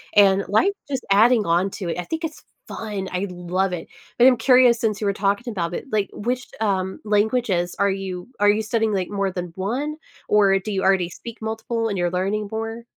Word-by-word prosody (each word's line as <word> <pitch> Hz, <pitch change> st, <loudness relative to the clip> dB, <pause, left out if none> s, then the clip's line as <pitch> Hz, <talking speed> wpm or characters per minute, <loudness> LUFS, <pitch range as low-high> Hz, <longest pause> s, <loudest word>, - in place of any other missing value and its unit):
and, 200 Hz, -1 st, +5 dB
like, 345 Hz, -, +3 dB, 0.2 s
just 265 Hz, -3 st, -3 dB
adding 220 Hz, +2 st, +5 dB
on 175 Hz, +3 st, +2 dB
to 185 Hz, -4 st, -5 dB
it, -, -, -2 dB
I -, -, -2 dB
think 325 Hz, +1 st, -4 dB
it's 320 Hz, -1 st, -5 dB, 0.3 s
fun, 205 Hz, -4 st, -5 dB
I 185 Hz, +2 st, -2 dB
love 180 Hz, +1 st, -2 dB
it, 175 Hz, -, -6 dB, 0.3 s
but 245 Hz, -, +7 dB
I'm 255 Hz, -2 st, +5 dB
curious 250 Hz, 0 st, +5 dB
since 215 Hz, -3 st, -1 dB
you 210 Hz, -, 0 dB
were 200 Hz, -, +2 dB
talking 200 Hz, +5 st, -1 dB
about 175 Hz, -5 st, -3 dB
it, -, -, -4 dB
like, 210 Hz, -2 st, 0 dB
which, 245 Hz, +3 st, -3 dB
um, 190 Hz, -3 st, -1 dB
languages 210 Hz, -4 st, +1 dB
are 200 Hz, 0 st, +3 dB
you 190 Hz, 0 st, -5 dB
are 205 Hz, 0 st, +5 dB
you 210 Hz, +1 st, +3 dB
studying, 220 Hz, 0 st, 0 dB
like, 185 Hz, -2 st, -1 dB
more 200 Hz, -1 st, -1 dB
than 180 Hz, -1 st, -5 dB
1 255 Hz, +11 st, -2 dB, 0.3 s
or 200 Hz, -2 st, +5 dB
do 210 Hz, +3 st, -5 dB
you 195 Hz, -1 st, -1 dB
already 190 Hz, -2 st, +3 dB
speak 230 Hz, +5 st, -10 dB
multiple, 225 Hz, +1 st, -2 dB
and 200 Hz, -, -2 dB
you're 175 Hz, -1 st, 0 dB
learning 195 Hz, +4 st, -1 dB
more? 225 Hz, +1 st, -4 dB
205 Hz, 215 wpm, -22 LUFS, 190-225 Hz, 0.3 s, but